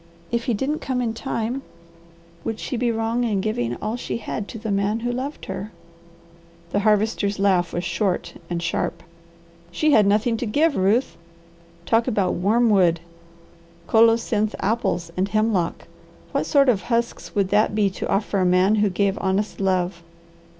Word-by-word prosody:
If 235 0 -1
he 240 - +1
didn't 280 +8 -1
come 260 -1 -2
in 235 -3 -1
time, 235 +1 -3 0.8
would 225 -1 -3
she - - -4
be 240 0 +1
wrong 225 +2 -1
in 215 -5 0
giving 120 - -1
all 215 - -3
she 245 - -4
had 210 -2 -5
to - - -8
the 220 -1 -4
man 200 +3 0
who 240 +1 -1
loved 260 +4 -5
her?" 195 +2 -5 1.0
The 205 - +1
Harvester's 210 -1 +1
laugh 185 -3 +2
was 175 - -3
short 175 -1 -1 0.2
and 170 -1 -2
sharp. 170 0 -2 0.7
"She 305 - +1
had 210 -7 +5
nothing 220 +3 +2
to 240 - -3
give, 295 +7 +2
Ruth! 205 +7 +1 0.7
Talk 230 +1 +2
about 205 -6 +1
worm 220 +6 +2
wood, 175 -4 +4 0.9
colocynth 225 -1 +3
apples, 195 -5 -1
and 190 +2 0
hemlock! 215 -5 0 0.4
What - - -1
sort 280 -2 +4
of 220 -6 +3
husks 235 -1 -2
would 200 -2 +1
that 210 +1 +2
be 205 -2 +2
to - - -5
offer 200 0 0
a - - +2
man 185 +3 +4
who 210 - +3
gave 195 +2 0
honest 195 +2 -1
love? 185 -3 0
210 Hz, 165 wpm, -23 LUFS, 190-230 Hz, 1.0 s, had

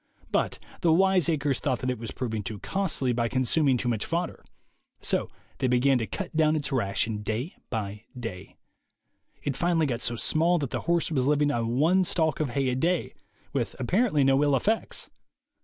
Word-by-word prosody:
But - - +1 0.2
the 170 - +4
wiseacres 165 -6 +3
thought 130 -4 0
that 130 +1 -1
it 125 - -4
was 115 - -6
prov 125 -4 -4
ing 110 - -1
too 105 +2 -5
costly 155 - 0
by 120 0 +1
consuming 130 +2 +2
too 125 - -3
much 115 -4 0
fodder. 170 +1 -3 0.6
So - - -1 0.3
they 130 - +1
began 125 +1 +3
to 110 - -2
cut 190 -4 -5
down 155 -1 +4
its 150 -1 -2
ration, 110 -3 0
day 110 - -3 0.2
by 105 -1 -4
day. 100 -7 -7 0.9
It 140 - -1
finally 165 +1 +2
got 125 -4 -2
so 120 - -1
small 165 +8 +2
that 140 -6 -3
the - - -2
horse 170 -1 +2
was 130 -4 +1
living 145 0 +3
on 115 -4 -1
one 175 +6 +4
stalk 160 -4 +1
of 155 -3 0
hay 135 -2 +2
a 125 - 0
day, 170 +6 0 0.4
with - - -1
apparently 175 - +2
no 135 +1 +4
ill 145 -2 +3
effects. 215 - -1
135 Hz, 190 wpm, -27 LUFS, 120-160 Hz, 0.9 s, the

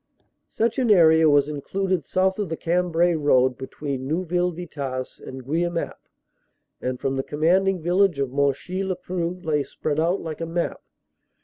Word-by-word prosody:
Such 230 +3 0
an 250 -3 +1
area 160 -5 +6
was 145 -1 +4
included 180 +3 -2
south 190 +1 +1
of 205 -5 -2
the 160 - -3
Cambrai 175 0 +1
road 130 -5 +3
be 130 +1 -7
tween 135 -3 -5
Neuville 180 +3 0
Vitasse 140 -7 -5
and 130 -1 -9
Guemappe 170 +4 -2 0.7
and 125 0 -3
from 135 0 -1
the 135 - -1
com 150 +2 -7
manding 185 +1 +3
vantage 180 -1 +3
of 135 -2 -1
Monchy 140 +7 0
le 190 -1 -1
Preux 180 0 -4
lay 150 -2 +1
spread 145 +2 -3
out 170 +4 +1
like 160 -1 -6
a 165 - -2
map. 170 +1 -2
165 Hz, 170 wpm, -24 LUFS, 140-180 Hz, 0.7 s, area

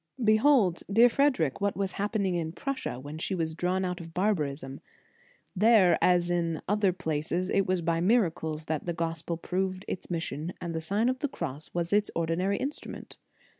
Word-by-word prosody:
Behold, 215 - +4
dear 230 +4 +7
Frederic, 230 - +1
what 200 -1 0
was 195 -1 -1
happen 205 0 -1
ing 185 - 0
in 165 -2 -2
Prussia 270 - -4
when 145 +4 -8
she 190 - -2
was 160 -2 -2
drawn 180 +3 0
out 180 0 -3
of 165 -1 -11
barbarism. 150 -9 -1 0.8
There, 195 -4 +5
as 175 -1 +3
in 170 -2 0
other 205 -1 +2
places, 170 +1 -2
it 195 0 +2
was 185 -2 0
by 165 0 +1
miracles 165 -7 +1
that 155 +1 -3
the 170 - 0
Gospel 165 0 -3
proved 185 +2 -2
its - - -5
mission, 165 -1 -3
and 170 -1 -4
the 160 - -2
Sign 200 +8 +1
of 255 0 0
the 290 - 0
Cross 155 - -5
was 170 +2 -1
its 205 0 +3
ordinary 170 +4 0
instrument. 280 +3 -6
180 Hz, 180 wpm, -28 LUFS, 165-200 Hz, 0.8 s, dear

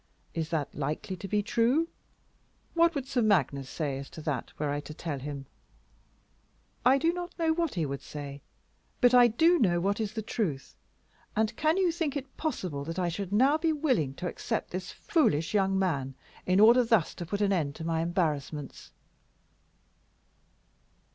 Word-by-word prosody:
Is 160 -1 -2
that 160 -4 -2
likely 150 +6 -3
to 195 - -7
be 205 +2 +1
true? 240 +9 +2 0.9
What 335 0 +4
would 275 -3 -2
Sir 255 -2 0
Magnus 140 - +2
say 140 -4 -3
as 135 - -8
to 160 - -9
that 145 -6 -3
were 150 -1 -1
I 145 - -1
to 150 +1 -9
tell 155 -4 -4
him?" 140 0 -6 1.4
"I 255 +3 +6
do 330 +5 +2
not 355 0 -6
know 325 -2 +2
what 335 - -1
he 165 -3 0
would 140 -1 -4
say, 140 -1 -8 0.6
but 245 -1 +5
I 245 -1 +8
do 325 +10 +4
know 175 -5 +3
what 200 +4 0
is 215 -1 -2
the 220 -2 -4
truth. 175 - -3 0.6
And 220 +1 +1
can 315 +6 +2
you 370 -3 +3
think 320 -4 -2
it 270 -1 -8
possible 180 - -3
that 165 +3 -5
I 180 -2 +1
should 190 +2 -4
now 265 +9 +4
be 325 0 +2
willing 255 - 0
to 180 - -4
accept - - -3
this 180 0 -4
foolish 160 - +1
young 195 -2 +2
man 140 -9 -1 0.3
in 185 +1 +3
order 235 +4 +7
thus 225 -8 +2
to 175 - -6
put 200 +3 -2
an 200 -1 +2
end 145 -6 -1
to - - -7
my 165 -1 0
embarrassments?" 155 -5 -2
190 Hz, 180 wpm, -29 LUFS, 150-255 Hz, 1.4 s, I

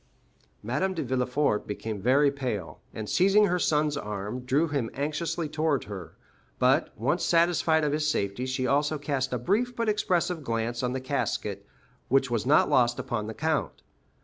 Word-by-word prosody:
Madame 185 - -1
de 160 - -2
Villefort 125 -1 0
became 105 0 -5
very 140 +6 +4
pale, 125 -11 -4
and, 110 -1 -6
seizing 195 - +4
her 180 -2 +1
son's 150 -2 +1
arm, 105 -1 -4
drew 135 +6 +1
him 140 -7 -2
anxiously 155 +3 -2
toward 155 -2 0
her; 95 -5 -8 0.4
but, - - +3
once 150 - 0
satisfied 165 -2 +3
of 150 - +1
his 150 0 +1
safety, 100 -1 -1
she 130 0 -1
also 145 +3 +1
cast 140 -2 -2
a 125 - 0
brief 220 - 0
but 230 -1 -1
expressive 180 -6 0
glance 115 -1 -2
on 125 -1 -1
the 130 - -2
casket, 130 - -3 0.4
which 135 -1 +2
was 120 0 -1
not 150 +2 +5
lost 120 -1 +3
upon 120 -5 -3
the 110 - -6
count. 155 - -2
140 Hz, 170 wpm, -27 LUFS, 120-160 Hz, 0.4 s, not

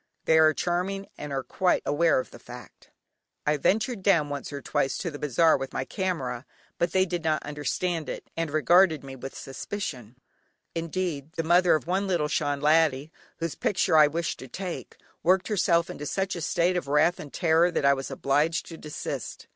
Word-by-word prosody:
They 160 0 +5
are 155 0 +6
charming, 180 +4 -2
and 150 - -7
are 135 -1 -2
quite 185 +5 +1
aware 165 +3 +3
of 130 - -6
the - - -12
fact. - - -13 0.6
I 150 - +2
ventured 215 - +1
down 170 -7 +3
once 145 0 -5
or 140 - -5
twice 135 0 -1
to 170 - -3
the 145 - -8
bazaar 150 +3 +3
with 135 0 -5
my 135 - -2
camera, 135 - -3 0.3
but 170 0 +1
they 185 +1 +3
did 175 -2 -3
not 155 -2 0
understand 150 +3 -2
it, - - -6
and 165 -1 -2
regarded 160 +1 +4
me 135 -1 -8
with 135 +1 -8
suspicion; 135 - -6 0.6
indeed, 165 -3 -3
the 165 -2 -2
mother 175 +1 +4
of 155 - -3
one 190 +3 0
little 170 -5 +1
Shan 145 -1 -1
laddie, 150 -1 +3 0.3
whose 165 -3 -3
picture 185 -4 +1
I 155 -1 +8
wished 165 +3 -3
to 130 - -9
take, 180 +6 -6 0.2
worked 185 +3 +2
herself 170 -5 +2
up - - -18
into 150 - -6
such 190 +4 -1
a 170 - -5
state 175 +2 +1
of 175 - -3
wrath 150 +5 +3
and 145 - -8
terror 170 0 +3
that 170 - -1
I 140 - +6
was 135 0 -4
obliged 145 +4 0
to 165 - -8
desist. 150 -1 -6
160 Hz, 195 wpm, -27 LUFS, 145-180 Hz, 0.6 s, I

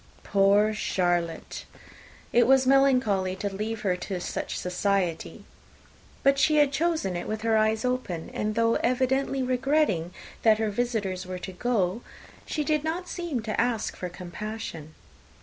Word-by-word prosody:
Poor 200 +2 +3
Charlotte! 175 -5 -1 0.7
it 240 - +5
was 265 0 +5
melancholy 250 -9 +3
to 200 +1 -4
leave 215 +2 -3
her 185 -3 +1
to 180 +1 -4
such - - -4
society! 180 -1 -1 0.8
But 275 0 +4
she 305 +3 +4
had 295 -2 +4
chosen 310 - 0
it 175 - -4
with 215 0 -4
her 225 -1 +2
eyes 220 +1 +2
open; 250 -10 -2
and 215 0 -2
though 230 0 +3
evidently 265 +2 +1
regretting 255 - +1 0.3
that 220 -2 +5
her 220 -1 -1
visitors 200 -5 -2
were 185 0 -4
to 185 +1 -7
go, 205 -1 0 0.5
she 305 - -1
did 305 0 0
not 340 +3 -3
seem 335 -11 -3
to 215 -1 0
ask 235 -3 -1
for 180 - -5
compassion. 175 -3 -7
220 Hz, 150 wpm, -27 LUFS, 185-260 Hz, 0.8 s, it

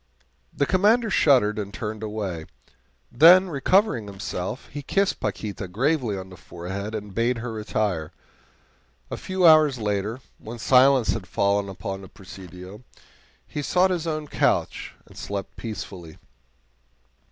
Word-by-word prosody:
The 140 - 0
Commander 210 - +3
shuddered 120 - +3
and 100 -1 -5
turned 110 +1 -5
away. 100 -7 -4 0.6
Then, 180 +8 +7
recovering 145 - +2
himself, 95 +2 -5
he 145 - -6
kissed 195 +8 0
Paquita 100 -3 -4
gravely 120 - 0
on 95 0 -8
the 90 - -12
forehead 95 +7 -6
and 105 -2 -6
bade 115 +3 +1
her 115 0 -5
retire. 105 -7 -2 1.0
A - - -3
few 185 -1 -1
hours 155 -4 +6
later, 105 +1 -2 0.2
when 115 +2 -8
silence 130 +1 +4
had - - -2
fallen 100 0 0
upon 95 +1 -6
the 95 - -11
Presidio, 95 +1 -11 0.6
he 150 - -5
sought 185 +5 +2
his 170 -2 -2
own 155 -1 -3
couch - - -1
and - - -18
slept 100 -1 -6
peacefully. 95 -7 -8
110 Hz, 135 wpm, -24 LUFS, 100-145 Hz, 1.0 s, Then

